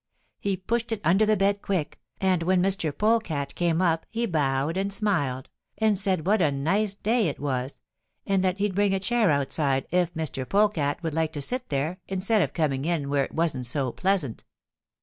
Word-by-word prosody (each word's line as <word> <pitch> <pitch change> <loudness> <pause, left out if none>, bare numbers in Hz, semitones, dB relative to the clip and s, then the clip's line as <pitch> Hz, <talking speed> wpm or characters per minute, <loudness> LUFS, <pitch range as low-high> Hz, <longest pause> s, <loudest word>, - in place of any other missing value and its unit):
He 200 -1 -1
pushed 230 +5 -2
it 225 - -1
under 190 +7 +3
the 215 -1 +3
bed 200 +1 +1
quick, 175 -7 -2 0.2
and 185 -3 +2
when 180 +2 +2
Mr. 185 -4 +1
Polecat 185 -8 0
came 170 0 +1
up 165 -2 +1
he 235 +1 -1
bowed 145 -4 0
and 195 +1 -1
smiled, 165 - -1 0.3
and 215 0 +3
said 190 -4 +1
what 210 +1 +3
a 155 -4 +3
nice 195 +9 0
day 220 0 +1
it 145 - -4
was, 130 -1 -3 0.5
and 195 -1 +1
that 185 0 +1
he'd 205 -1 0
bring 200 0 +2
a - - 0
chair 225 0 +2
outside 140 -1 +1
if 180 -1 +2
Mr. 135 -5 -3
Polecat 180 -8 +1
would 160 -2 -2
like 160 0 0
to 150 - -3
sit 250 - -2
there 150 +6 -2
instead 195 +3 +1
of 145 -6 0
coming 140 -5 0
in 155 -5 -1
where 140 -1 +2
it - - -12
wasn't 155 -7 0
so 130 0 -1
pleasant. 185 - -1
180 Hz, 195 wpm, -26 LUFS, 145-200 Hz, 0.5 s, under